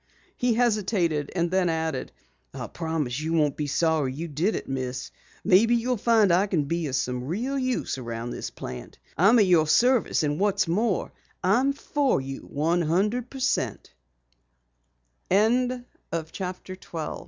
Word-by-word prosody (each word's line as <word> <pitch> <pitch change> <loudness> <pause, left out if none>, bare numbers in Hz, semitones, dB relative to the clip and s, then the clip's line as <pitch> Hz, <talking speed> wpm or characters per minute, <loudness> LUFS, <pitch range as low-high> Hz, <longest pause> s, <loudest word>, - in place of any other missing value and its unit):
He 245 -2 +1
hesitated 200 - +1
and 170 -1 0
then 185 -2 +2
added: 160 -4 -2 0.4
"I - - -4
promise 160 -6 -3
you 160 +2 -2
won't 150 -4 +2
be 150 - -3
sorry 155 -2 +1
you 160 +6 -5
did 165 +8 0
it, - - -5
Miss. 130 -1 -4 0.3
Maybe 225 +6 +5
you'll 245 +2 0
find 220 -3 +4
I 190 +4 +3
can 175 -7 +1
be 165 +2 -2
of 135 - -2
some 125 -1 -2
real 230 - -2
use 255 - -1
around 115 -1 -5
this - - -5
plant. 60 -1 -8 0.2
I'm 200 +7 +5
at 210 - +5
your 170 -4 +4
service 245 0 +3
and 145 0 -1
what's 200 -2 +2
more, 200 +3 0 0.3
I'm 245 +9 +3
for 280 - 0
you 135 0 -6
one 165 +4 0
hundred 210 +10 0
pe 270 - -9
170 Hz, 140 wpm, -26 LUFS, 145-220 Hz, 0.4 s, Maybe